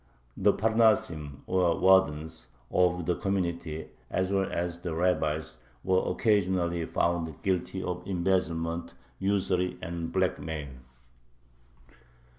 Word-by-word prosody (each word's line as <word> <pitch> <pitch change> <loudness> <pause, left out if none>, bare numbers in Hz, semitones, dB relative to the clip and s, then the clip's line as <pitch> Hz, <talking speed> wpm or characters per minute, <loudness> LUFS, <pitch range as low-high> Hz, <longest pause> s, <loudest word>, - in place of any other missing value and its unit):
The - - +4
parnasim, 110 -10 +1
or 90 -3 +2
wardens, 80 -4 +3 0.2
of 90 -1 +2
the 90 - +1
community, 85 -5 -2 0.2
as 95 +1 0
well 95 -1 +1
as 85 0 -2
the 85 -2 -4
rabbis, 80 -3 0 0.2
were 95 0 +2
occasionally 90 -6 +1
found 85 -4 -1
guilty 95 0 -1
of 90 0 -3
embezzlement, 85 -3 -1 0.2
usury, 95 -2 0
and 85 -1 -5
blackmail. 75 -3 -1
90 Hz, 100 wpm, -29 LUFS, 80-95 Hz, 0.2 s, The